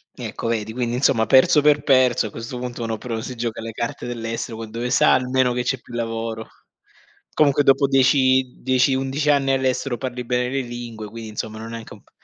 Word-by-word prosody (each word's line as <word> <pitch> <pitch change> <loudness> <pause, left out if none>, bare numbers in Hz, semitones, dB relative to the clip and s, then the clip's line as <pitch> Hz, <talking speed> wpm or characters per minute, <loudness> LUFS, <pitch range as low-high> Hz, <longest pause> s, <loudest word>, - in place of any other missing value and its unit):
Ecco - - -5
vedi, 110 -1 -2
quindi 120 0 -2
insomma 125 -3 +2
perso 130 +4 +5
per 145 0 +3
perso, 130 -4 +3
a - - -10
questo 115 +3 -7
punto 125 -1 -6
uno 115 -1 -2
però 115 0 -4
si 125 +2 -6
gioca 115 -1 -4
le 115 0 -6
carte 120 +2 -4
dell'estero 115 -1 -4
con 110 -1 -8
dove 120 +2 -3
sa - - +4
almeno 130 -1 +2
che 125 0 -1
c'è 130 +1 -1
più - - -15
lavoro. 115 -1 -4 0.9
Comunque 145 -2 +3
dopo 135 0 +4
dieci 130 -1 +3
dieci, 130 +1 +3
11 135 +3 -1
anni 140 -2 +3
all'estero 130 -1 0
parli 125 0 -5
bene 125 0 0
le 135 +1 -1
lingue, 120 -3 -7
quindi 115 0 -8
insomma 110 +1 -5
non 110 - -7
è - - -8
neanche 115 -1 -8
un - - -15
p - - -29
125 Hz, 210 wpm, -22 LUFS, 115-130 Hz, 0.9 s, perso